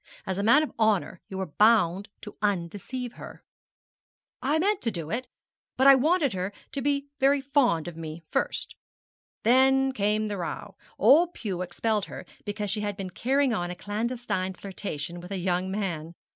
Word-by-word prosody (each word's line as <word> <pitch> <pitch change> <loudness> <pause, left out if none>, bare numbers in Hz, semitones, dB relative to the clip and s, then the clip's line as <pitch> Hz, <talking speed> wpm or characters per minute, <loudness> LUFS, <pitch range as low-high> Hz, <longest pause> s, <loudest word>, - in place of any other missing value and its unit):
As 190 0 -2
a - - 0
man 275 +8 +6
of 310 - -5
honour 210 -5 +1
you 190 - -6
were 190 - -1
bound 200 +1 +3
to 210 - -9
undeceive 205 +6 -2
her.' - - -10 1.0
'I 290 +4 +2
meant 390 +4 +1
to 235 - 0
do 170 -6 -5
it, 250 +2 -2 0.5
but 265 - +3
I 275 - +10
wanted 290 - +3
her 185 +1 -2 0.2
to 275 0 -3
be 280 +1 0
very 275 +1 +4
fond 265 - +2
of 175 - -6
me 160 0 -7
first. - - -1 0.7
Then 265 +3 +4
came 215 -2 0
the 205 -1 -3
row; 170 - -5 0.2
old 340 +4 +5
Pew 190 -5 -3
expelled 205 +4 -1
her - - -9 0.2
because 205 -1 -2
she 215 - -1
had 205 -1 -3
been 190 -3 -5
carrying 265 +5 +1
on 175 -5 -1
a 180 - -5
clandestine 210 -1 -2
flirtation 175 -4 -5
with 180 +2 -10
a 195 - -2
young 180 0 0
man. 170 -5 -3
210 Hz, 175 wpm, -27 LUFS, 185-260 Hz, 1.0 s, I